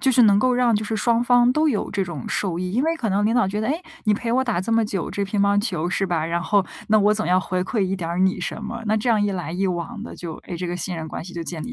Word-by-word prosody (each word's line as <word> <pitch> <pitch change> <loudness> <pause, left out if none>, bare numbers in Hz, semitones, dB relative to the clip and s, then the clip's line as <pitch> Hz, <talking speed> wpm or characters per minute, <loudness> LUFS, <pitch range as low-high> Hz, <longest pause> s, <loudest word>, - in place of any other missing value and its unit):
就 265 0 +3
是 250 -1 +5
能 205 -3 +6
够 255 +5 +3
让 245 -2 +3
就 210 - 0
是 220 +1 -2
双 235 +1 +2
方 245 0 +4
都 310 +3 +2
有 225 -8 -1
这 195 -2 -1
种 160 -8 -6
受 180 -4 -1
益， 180 0 -3
因 245 +5 +1
为 325 +2 +1
可 240 -8 -2
能 200 +1 +1
领 220 - +2
导 245 -3 +3
觉 205 +3 -2
得- 220 - -1
哎？ 315 +4 -1 0.2
你 215 - +2
陪 230 +2 -1
我 260 +2 +3
打 235 -9 -1
这么 225 +3 +1
久， 195 -5 -3
这 200 - -2
乒 200 +1 -1
乓 200 0 +3
球 180 -7 -2
是 195 - 0
吧？ 170 -4 -1
然 170 +1 -1
后 200 0 +2 0.2
那 215 0 +5
我 210 +1 +4
总 215 - -2
要 180 +1 +3
回 185 0 -1
馈 220 +5 -3
一 190 0 0
点 170 -3 -4
儿 170 - -2
你 190 0 +2
什 180 - -4
么， 230 +2 -5
那 215 +1 +2
这 220 +3 -1
样 220 -3 +3
一 205 - +1
来 180 -4 -4
一 185 +3 -1
往 185 +5 -4
的 - - -8
就， 170 -2 -6
哎， 175 - -6
这 180 +1 -4
个 175 0 -3
信 180 0 -4
任 160 -1 -5
关 160 - -6
系 180 - -10
就 170 - -5
建 165 -1 -5
立 245 - -6
205 Hz, 360 characters per minute, -23 LUFS, 180-230 Hz, 0.2 s, 能